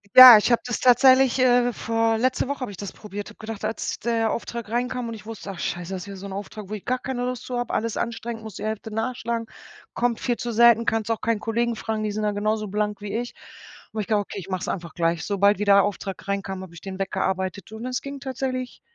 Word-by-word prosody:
Ja, 255 -3 +13
ich 230 - 0
habe 235 - +4
das 245 - -2
tatsächlich, 260 +1 +6
äh, 245 -1 +4
vor 225 0 0
letzte 255 +3 +1
Woche 280 -1 -4
habe 245 -5 -3
ich 195 - -11
das 200 0 -6
probiert. 205 -1 -8
Habe 210 - -15
gedacht, 220 -1 -7
als 220 +1 -3
der 230 -2 0
Auftrag 235 -1 -4
reinkam 245 0 -1
und 230 - -5
ich 215 0 -11
wusste: 215 -3 -7
„Ach 185 - -9
Scheiße, 175 +2 -3
das 185 - -4
ist - - -11
wieder 200 -1 -8
so 195 - -9
'n 195 - -6
Auftrag, 205 +1 -7
wo 210 - -7
ich 210 - -5
gar 255 +1 0
keine 250 -1 -4
Lust 250 0 -3
zu 250 - -3
habe, 245 - -3
alles 230 0 -1
anstrengend, 235 -1 -4
muss 220 -3 -9
die - - -7
Hälfte 220 0 -4
nachschlagen, 230 +1 -2 0.5
kommt 240 -1 0
viel 245 - 0
zu 240 - -3
selten, 235 0 +6
kannst 225 0 0
auch 225 - -1
keinen 230 -1 0
Kollegen 230 +2 0
fragen, 220 0 -3
die 210 - -1
sind 215 +1 -3
da 210 - +1
genauso 215 +1 -1
blank 210 +1 -2
wie 205 0 -5
ich. 240 +1 -5 0.6
Und 220 - -2
ich 200 - -6
glaube, 210 -2 +2
okay, 205 - -7
ich 195 - -9
mache 185 -1 -2
es - - -4
einfach 170 -3 -4
gleich.“ 165 -1 0
Sobald 200 0 +2
wie 210 - 0
der 200 -1 +6
Auftrag 200 -1 -4
reinkam, 195 -1 -3
habe 175 - -11
ich 170 - -12
den 190 -1 -7
weggearbeitet 190 +1 -2
und 220 +2 -7
es 255 0 -2
ging 280 0 -7
tatsächlich 260 -1 -4
220 Hz, 255 wpm, -24 LUFS, 200-240 Hz, 0.6 s, Ja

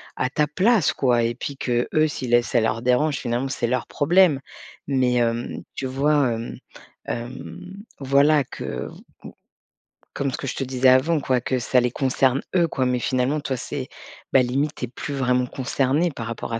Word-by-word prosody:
à 130 - -1
ta 150 +1 +1
place, 190 +2 +3
quoi 125 -3 +2
et 115 0 -1
puis 140 +2 -5
qu'eux, 125 +5 +1
si 145 - -5
les 120 0 +4
ça 120 - +1
leur 110 +1 0
dérange 140 +4 +2
finalement, 120 +2 -2
c'est 120 -3 -1
leur 125 +1 -1
problème. 165 -1 +3 0.5
Mais, 130 -3 +1
hem, 120 0 -1
tu 135 - -4
vois, 140 +1 +2
hem 115 +1 -6 0.5
hem, 180 - -7 0.2
voilà 140 +2 +4
que, - - -6 1.3
comme 140 -1 -2
ce - - -4
que - - -6
je - - -2
te - - -2
disais 130 0 +3
avant, 140 +6 +4
quoi, 130 -2 +1
que 130 +2 -1
ça 125 +1 +2
les 125 - +1
concerne 130 +1 +1
eux, 170 -2 +4
quoi, 130 -5 -1
mais 125 -1 +1
finalement, 130 +5 0
toi, 135 -3 -3
c'est, - - -5 0.5
bah, 135 - +7
limite, 140 +4 -1
tu 125 - -4
es - - -11
plus 145 +3 -6
vraiment 125 -2 +1
concerné 135 +6 0
par 115 -4 -6
rapport 115 0 -5
à 115 - -1
130 Hz, 190 wpm, -23 LUFS, 125-145 Hz, 1.3 s, bah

